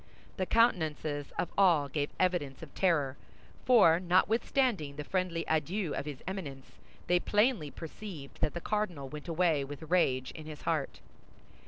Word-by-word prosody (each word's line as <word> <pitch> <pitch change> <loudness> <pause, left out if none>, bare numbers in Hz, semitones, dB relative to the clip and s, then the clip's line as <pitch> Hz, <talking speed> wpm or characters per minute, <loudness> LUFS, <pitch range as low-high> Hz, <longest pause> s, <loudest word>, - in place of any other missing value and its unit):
The 185 -2 -1
countenances 155 - +1
of 175 - -1
all 170 -7 +4
gave 145 +1 -2
evidence 170 -7 0
of 150 - -11
terror, 150 -8 +1 0.5
for 210 -10 +6
notwithstanding 185 - +1
the 150 - -5
friendly 180 0 -1
adieu 165 +2 0
of 140 - -4
his 145 -3 -7
Eminence, 150 -9 -7 0.3
they 180 0 +3
plainly 210 - +2
perceived 160 -2 -9
that 150 - 0
the 175 - -3
cardinal 180 -11 -2
went 150 +2 -8
away 165 -3 +2
with 145 +3 -8
rage 130 -8 +2
in 155 -1 -10
his 150 -1 -9
heart. 155 -4 -2
165 Hz, 150 wpm, -31 LUFS, 145-185 Hz, 0.5 s, for